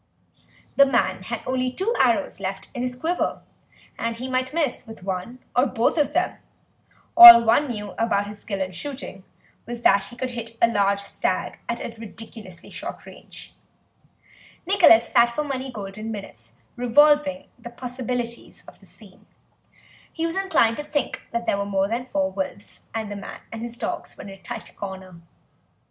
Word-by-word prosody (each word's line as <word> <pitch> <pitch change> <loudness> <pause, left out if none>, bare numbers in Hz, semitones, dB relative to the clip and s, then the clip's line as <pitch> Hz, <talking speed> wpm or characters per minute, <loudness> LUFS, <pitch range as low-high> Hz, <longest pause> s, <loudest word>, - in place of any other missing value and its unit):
The 280 - +8
man 235 -8 +1
had 235 +1 -4
only 255 0 -1
two 385 - -1
arrows - - +2
left - - -5
in 245 - -4
his 250 0 -2
quiver, 330 +7 -2 0.6
and 230 0 -2
he 250 +3 -5
might 255 0 -1
miss 295 -6 -2
with 225 -4 -11
one 190 +6 -4 0.2
or 250 +3 +4
both 235 -1 +1
of 300 -3 +1
them; - - 0 0.8
all 350 -9 +13
one 230 +6 +3
knew 210 -5 -5
about 215 -3 +1
his 205 0 -9
skill 200 -3 -4
in 185 - -6
shooting 195 - -7 0.4
was 240 0 -6
that 195 0 +4
he 240 - -9
could 255 +1 -4
hit 230 -1 -7
a 235 - +5
large 200 -3 +1
stag 200 - -2
at 235 - -2
a 230 - -6
ridiculously 220 -4 -9
short - - -7
range. - - -13 1.1
Nicholas 345 - +6
sat 235 0 +5
for 270 +6 -2
many 265 -2 -4
golden 210 0 -7
minutes 205 -3 -8 0.2
revolving 285 +3 +3
the 235 - -9
possibilities 245 -1 -5
of - - -15
the - - -19
scene; - - -16 0.8
he 325 - -2
was 330 +1 -2
inclined 380 -13 +2
to 295 - -4
think 295 -1 -3
that 235 0 -3
there 200 - 0
were - - 0
more 195 -1 0
than 235 +4 -3
four 195 -6 -1
wolves 190 +1 -6
and 220 -2 -3
that - - -4
the 200 - -7
man - - -8
and 225 - -7
his 235 0 -6
dogs - - -5
were - - -9
in - - -9
a 195 - -10
tight 230 +3 -8
corner. 190 -3 -8
235 Hz, 180 wpm, -23 LUFS, 205-260 Hz, 1.1 s, all